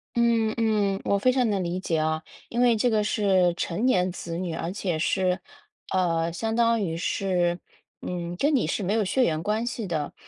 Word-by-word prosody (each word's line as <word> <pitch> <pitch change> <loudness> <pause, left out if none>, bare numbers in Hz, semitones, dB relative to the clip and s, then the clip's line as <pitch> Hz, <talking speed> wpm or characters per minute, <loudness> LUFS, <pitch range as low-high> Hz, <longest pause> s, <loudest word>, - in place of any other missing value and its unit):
嗯， 230 -2 +2
嗯， 210 -3 +1
我 200 - +1
非 255 +5 +4
常 250 -2 +2
能 195 -3 0
理 175 +2 -2
解 165 -4 -1
啊， 155 0 -1 0.3
因 235 - -3
为 240 -2 +5
这 240 +3 +2
个 215 -2 +2
是 190 -5 +2
成 190 +8 -2
年 185 -7 +2
子 170 -1 -6
女， 175 -2 -3
而 165 +2 -3
且 185 -5 -2
是， 185 +2 +1 0.5
呃， 170 -2 +1
相 225 +5 -2
当 230 -1 +3
于 165 -4 -2
是， 175 -1 0 0.4
嗯， 175 -1 -4
跟 290 +5 +2
你 235 - +2
是 175 - -2
没 195 +3 0
有 220 -3 +1
血 255 +7 +2
缘 160 -3 0
关 215 +4 0
系 235 -3 -3
的， 155 -5 -3
190 Hz, 215 characters per minute, -26 LUFS, 175-225 Hz, 0.5 s, 为